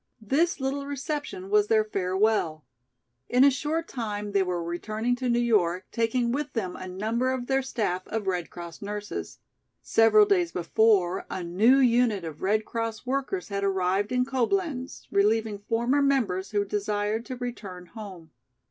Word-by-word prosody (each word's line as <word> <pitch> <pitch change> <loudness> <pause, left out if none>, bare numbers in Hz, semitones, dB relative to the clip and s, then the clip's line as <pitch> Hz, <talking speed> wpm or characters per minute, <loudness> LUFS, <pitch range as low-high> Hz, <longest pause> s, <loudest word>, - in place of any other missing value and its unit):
This 285 +11 +1
little 275 +1 -2
reception 285 -8 -4
was 210 0 +4
their 220 0 +4
farewell. 190 -5 0 0.6
In 250 +2 +5
a 280 - +7
short 310 +5 -2
time 210 -4 -4
they 200 -1 +3
were 180 -2 -1
returning 215 +8 -2
to 255 -1 -2
New 235 - +3
York 195 -7 +2
taking 235 +1 0
with 290 +3 -3
them 190 -6 -2
a 185 - -7
number 220 +7 -1
of 255 -2 -3
their 270 +1 +1
staff 210 -8 -2
of 220 -2 -3
Red 180 -3 -1
Cross 170 -1 -9
nurses. 205 0 -5 0.5
Several 225 - +5
days 365 -4 +2
before 190 0 +2
a 185 - -4
new 205 +10 +4
unit 240 -6 +3
of 160 -2 -7
Red 215 +3 +1
Cross 230 0 -4
workers 275 - -2
had 200 0 -2
arrived 195 +2 +1
in 250 0 +2
Coblenz, 270 +1 -1
relieving 210 +1 +2
former 235 +6 +1
members 235 -9 +1
who 205 -1 0
desired 210 +2 -1
to 255 - -4
return 210 -7 -6
home. 185 -5 -10
220 Hz, 160 wpm, -27 LUFS, 195-255 Hz, 0.6 s, a